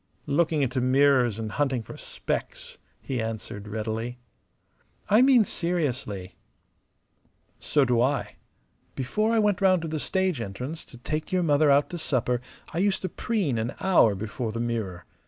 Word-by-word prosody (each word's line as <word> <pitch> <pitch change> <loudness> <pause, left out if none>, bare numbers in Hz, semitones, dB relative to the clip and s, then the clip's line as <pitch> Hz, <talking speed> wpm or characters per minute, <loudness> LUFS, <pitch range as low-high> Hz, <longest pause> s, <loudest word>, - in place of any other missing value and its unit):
"Looking 155 0 +2
into 130 0 0
mirrors 130 -3 +4
and 110 -1 -4
hunting 135 -2 0
for - - -10
specks," - - -5 0.2
he 130 -3 -2
answered, 110 -2 -5
readily. 110 +3 -3 0.9
"I 215 +3 +7
mean 255 -4 +6
seriously." 130 - -2 1.3
"So 145 -3 +2
do 120 -2 +2
I. 135 +3 0 0.6
Before 215 - 0
I 230 - +2
went 210 -2 +2
round 185 -3 +4
to - - -3
the 155 -1 -3
stage 190 -5 0
entrance 125 +10 -5
to 120 - -14
take 155 +5 -4
your 185 -1 +2
mother 150 -1 +4
out 140 +4 +4
to 175 - -4
supper 125 -5 0 0.3
I 165 - -1
used 195 0 +1
to 185 - -1
preen 180 - -1
an 115 +4 -3
hour 170 - +4
before 110 +3 -4
the 115 - -4
mirror. 110 -7 -3
135 Hz, 155 wpm, -26 LUFS, 115-170 Hz, 1.3 s, I